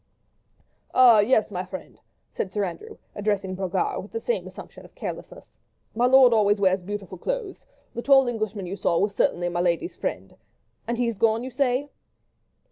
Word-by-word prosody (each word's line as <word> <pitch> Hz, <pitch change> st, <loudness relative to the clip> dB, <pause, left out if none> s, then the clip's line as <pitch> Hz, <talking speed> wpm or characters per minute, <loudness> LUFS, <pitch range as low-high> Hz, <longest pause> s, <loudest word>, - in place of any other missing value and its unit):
"Ah, 245 Hz, -4 st, +7 dB
yes, 215 Hz, 0 st, +2 dB
my 180 Hz, -1 st, -3 dB
friend," 185 Hz, +1 st, -10 dB, 0.3 s
said 190 Hz, -, -4 dB
Sir 205 Hz, 0 st, -1 dB
Andrew, 430 Hz, -, -6 dB, 0.2 s
addressing 205 Hz, -2 st, -2 dB
Brogard, 195 Hz, -, -2 dB
with -, -, -13 dB
the 455 Hz, -, -3 dB
same 480 Hz, +1 st, -2 dB
assumption -, -, -11 dB
of -, -, -17 dB
carelessness, -, -, -8 dB, 0.4 s
"my 240 Hz, +3 st, +2 dB
lord 255 Hz, -2 st, +7 dB
always 205 Hz, -2 st, +3 dB
wears 190 Hz, -1 st, +2 dB
beautiful 195 Hz, -1 st, -7 dB
clothes; 470 Hz, -, -4 dB, 0.3 s
the 235 Hz, -, -4 dB
tall 270 Hz, 0 st, +5 dB
Englishman 215 Hz, -4 st, -3 dB
you 180 Hz, +2 st, -5 dB
saw, 170 Hz, -4 st, 0 dB
was 200 Hz, +3 st, +1 dB
certainly 175 Hz, -2 st, 0 dB
my 175 Hz, 0 st, -1 dB
lady's 175 Hz, -, -1 dB
friend. -, -, -5 dB, 0.5 s
And 235 Hz, 0 st, -2 dB
he 245 Hz, -, +1 dB
has 230 Hz, -4 st, -3 dB
gone, 225 Hz, +1 st, +2 dB
you 260 Hz, -, -6 dB
say?" 275 Hz, +1 st, 0 dB
215 Hz, 175 wpm, -25 LUFS, 190-255 Hz, 0.5 s, Ah